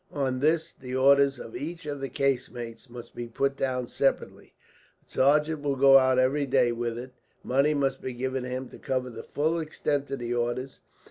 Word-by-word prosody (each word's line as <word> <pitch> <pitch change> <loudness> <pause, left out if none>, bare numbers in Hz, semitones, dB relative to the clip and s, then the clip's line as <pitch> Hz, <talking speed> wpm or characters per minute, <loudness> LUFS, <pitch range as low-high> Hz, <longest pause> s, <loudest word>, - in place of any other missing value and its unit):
On 130 -3 -1
this 160 +3 +1
the 130 -1 -7
orders 140 +1 +5
of 115 - -9
each 165 +3 -6
of 145 -2 -5
the 135 - -3
casemates 125 -3 -2
must 120 0 -10
be 120 - -6
put 135 +4 -1
down 125 -2 -2
separately. 135 - -2 0.5
A - - -25
sergeant 150 +3 +2
will 140 -1 0
go 135 0 +7
out 130 -1 +3
every 135 +3 +2
day 120 -2 +3
with 120 0 -3
it. 125 +1 -8 0.3
Money 140 +4 +2
must 140 -2 0
be 130 - -4
given 130 +2 -2
to 125 - -5
him 130 +1 -4
to - - -13
cover 130 -2 -2
the - - -8
full 160 +3 -1
extent 150 -2 -2
of 140 - -3
the 120 -1 -3
orders. 120 +2 -2
135 Hz, 200 wpm, -27 LUFS, 125-140 Hz, 0.5 s, go